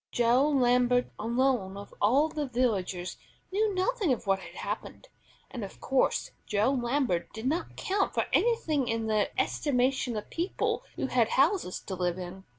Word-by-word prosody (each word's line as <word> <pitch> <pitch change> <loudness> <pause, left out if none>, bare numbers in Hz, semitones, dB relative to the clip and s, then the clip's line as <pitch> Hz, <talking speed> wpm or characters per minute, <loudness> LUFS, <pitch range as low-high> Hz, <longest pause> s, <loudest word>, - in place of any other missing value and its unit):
Joe 245 +4 +3
Lambert 250 -2 +3
alone 235 -4 0
of 200 - -10
all 265 +9 +4
the 300 -2 -3
villagers 200 -8 -1 0.3
knew 420 +2 +2
nothing 385 - +1
of 245 - -1
what 195 -1 +2
had - - -11
happened; - - -6 0.4
and 240 - -5
of 195 - -9
course 270 -1 +1 0.2
Joe 210 +5 +2
Lambert 240 -9 0
did 220 +2 -7
not 315 +6 -1
count 390 +1 -1
for - - +2
anything 315 - +2
in 225 0 -1
the 215 -2 +1
estimation 255 -3 +1
of 210 - -7
people 350 +7 -1
who - - -2
had 240 -4 +2
houses 280 - +2
to 195 - -6
live 180 -1 -1
in. 185 +1 -8
245 Hz, 160 wpm, -29 LUFS, 210-290 Hz, 0.4 s, all